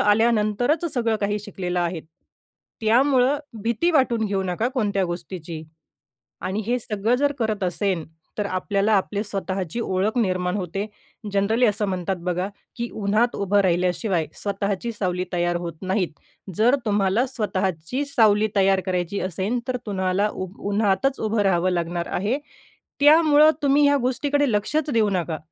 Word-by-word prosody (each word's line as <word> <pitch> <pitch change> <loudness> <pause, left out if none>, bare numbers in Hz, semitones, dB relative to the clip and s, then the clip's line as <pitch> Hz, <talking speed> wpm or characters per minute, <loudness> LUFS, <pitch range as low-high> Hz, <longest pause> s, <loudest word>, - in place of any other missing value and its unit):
आल्यानंतरच 225 +7 +2
सगळं 230 -3 +1
काही 205 +1 0
शिकलेला 180 -4 -3
आहे. 170 -1 -2 0.8
त्यामुळं 260 +4 +3 0.2
भीती 235 +10 +1
वाटून 255 -7 +2
घेऊ 200 -1 -1
नका 190 +5 -1
कोणत्या 205 -6 +1
गोष्टीची. 175 -2 -6 0.8
आणि 190 +3 -2
हे 245 +3 +1
सगळं 215 +1 0
जर 285 +2 +1
करत 215 -3 -1
असेल, 185 -2 -1 0.3
तर 210 - -1
आपल्याला 200 +2 0
आपली 200 +2 -2
स्वतःची 195 -2 -3
ओळख 200 +3 0
निर्माण 185 -4 0
होते. 195 +1 -3 0.5
जनरली 215 +5 +2
असं 210 -1 +1
म्हणतात 185 0 -2
बघा, 180 +1 0 0.3
की 235 0 -3
उन्हात 215 +4 +1
उभं 200 +1 +2
राहिल्याशिवाय 180 -1 +1
स्वतःची 200 +2 -2
सावली 180 -4 -2
तयार 175 0 +1
होत 170 - -4
नाहीत. 185 -1 0 0.5
जर 240 +5 +5
तुम्हाला 205 +2 +2
स्वतःची 205 - -2
सावली 220 -6 +3
तयार 195 -1 +3
करायची 180 +1 -1
असेल 190 +6 -2
तर 255 -1 -1
तुम्हाला 190 +1 0
उ 185 - -4 0.2
उन्हातच 215 +6 +1
उभं 220 0 0
राहावं 185 -2 +2
लागणार 170 0 -2
आहे. 215 +9 0 0.6
त्यामुळं 305 0 +7
तुम्ही 285 +1 +4
ह्या 285 - +4
गोष्टीकडे 285 +1 +1
लक्षच 280 +9 0
देऊ 225 -4 +3
नका. 170 -4 -1
205 Hz, 140 wpm, -23 LUFS, 185-235 Hz, 0.8 s, त्यामुळं